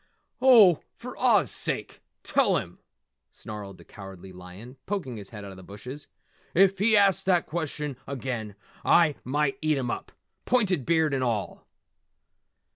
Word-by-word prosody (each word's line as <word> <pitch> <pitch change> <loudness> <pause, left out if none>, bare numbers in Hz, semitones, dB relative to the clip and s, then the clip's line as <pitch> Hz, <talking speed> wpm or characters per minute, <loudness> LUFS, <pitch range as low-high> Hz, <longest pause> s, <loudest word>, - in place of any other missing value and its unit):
"Oh, 220 - +7 0.2
for - - -9
Oz - - +3
sake - - -5 0.2
tell - - +2
him!" - - -7 0.5
snarled 105 -3 -9
the - - -16
Cowardly 95 -2 -11
Lion, 90 +8 -12
poking 175 - -3
his 100 -2 -9
head 105 -3 -9
out 100 - -8
of 95 - -12
the 95 - -12
bushes. 125 +10 -9 0.5
"If 195 +1 +4
he 215 +1 +4
asks 195 -1 +3
that 180 -3 +3
question 150 -3 -4
again 120 -6 -4 0.3
I 165 -3 +4
might 140 +1 -1
eat 155 -2 +1
him 125 -3 -2
up, - - -6 0.3
pointed 195 - +1
beard 160 -3 +2
and 130 -1 0
all!" 115 -5 -3
135 Hz, 150 wpm, -26 LUFS, 105-175 Hz, 0.5 s, Oh